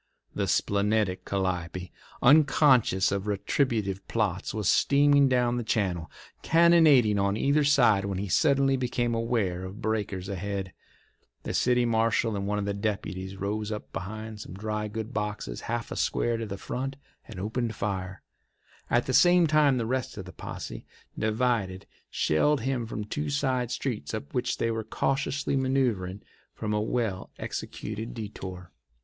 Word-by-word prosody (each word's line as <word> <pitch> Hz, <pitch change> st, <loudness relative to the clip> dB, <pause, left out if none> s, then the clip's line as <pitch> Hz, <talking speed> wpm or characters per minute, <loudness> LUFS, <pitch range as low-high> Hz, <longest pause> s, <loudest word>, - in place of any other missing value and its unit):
The -, -, -1 dB
splenetic 100 Hz, -1 st, +1 dB
Calliope, 90 Hz, -2 st, -2 dB, 0.3 s
unconscious 135 Hz, -8 st, +5 dB
of 100 Hz, +1 st, -2 dB
retributive 105 Hz, -2 st, -1 dB
plots, 100 Hz, -5 st, -1 dB
was 105 Hz, -3 st, -2 dB
steaming 140 Hz, -1 st, +4 dB
down 125 Hz, -1 st, +2 dB
the 120 Hz, -, -2 dB
channel, 95 Hz, -7 st, -1 dB, 0.3 s
cannonading 160 Hz, -10 st, +5 dB
on 100 Hz, +1 st, +1 dB
either 145 Hz, +5 st, +2 dB
side, 120 Hz, -9 st, +4 dB
when 100 Hz, -2 st, -2 dB
he 100 Hz, +2 st, -3 dB
suddenly 135 Hz, -, +3 dB
became 120 Hz, -2 st, -1 dB
aware 115 Hz, -6 st, -1 dB
of 95 Hz, +3 st, -8 dB
breakers 105 Hz, -5 st, -2 dB
ahead. 100 Hz, 0 st, -4 dB, 0.7 s
The -, -, -4 dB
city 125 Hz, -1 st, +3 dB
marshal 115 Hz, -1 st, +1 dB
and 100 Hz, 0 st, -3 dB
one 105 Hz, 0 st, 0 dB
of 100 Hz, -, -1 dB
the 100 Hz, -, -1 dB
deputies 100 Hz, -2 st, -3 dB
rose 105 Hz, +2 st, -3 dB
up 105 Hz, -, -6 dB
behind 110 Hz, +2 st, -6 dB
some 90 Hz, -, -9 dB
dry 105 Hz, +1 st, -3 dB
goods 110 Hz, +2 st, -5 dB
boxes 105 Hz, -, -4 dB
half 120 Hz, 0 st, -2 dB
a -, -, -3 dB
square 120 Hz, 0 st, 0 dB
to 115 Hz, -1 st, -4 dB
the 100 Hz, -1 st, -5 dB
front 135 Hz, +6 st, -4 dB, 0.3 s
and 110 Hz, -5 st, -8 dB
opened 110 Hz, +3 st, -2 dB
fire. 95 Hz, -2 st, -4 dB, 0.7 s
At 120 Hz, -, +2 dB
the 130 Hz, -, -2 dB
same 175 Hz, +5 st, +6 dB
time 150 Hz, -3 st, +4 dB
the 115 Hz, -, -1 dB
rest 130 Hz, -1 st, -2 dB
of 95 Hz, -, -6 dB
the 90 Hz, -, -11 dB
posse, -, -, -7 dB, 0.3 s
divided, 110 Hz, -4 st, 0 dB, 0.2 s
shelled 140 Hz, -, +2 dB
him 125 Hz, -2 st, -1 dB
from 110 Hz, -1 st, -4 dB
two 145 Hz, +8 st, -3 dB
side 130 Hz, -4 st, 0 dB
streets 120 Hz, -, -3 dB
up 70 Hz, -, -7 dB
which 125 Hz, 0 st, -1 dB
they 115 Hz, -, 0 dB
were 110 Hz, 0 st, -2 dB
cautiously 135 Hz, +5 st, -1 dB
manoeuvring 125 Hz, -8 st, 0 dB, 0.3 s
from 105 Hz, -1 st, -3 dB
a 105 Hz, -, +1 dB
well 110 Hz, -4 st, -2 dB
executed 110 Hz, +2 st, -5 dB
detour. 95 Hz, -5 st, -7 dB
110 Hz, 155 wpm, -27 LUFS, 100-125 Hz, 0.7 s, same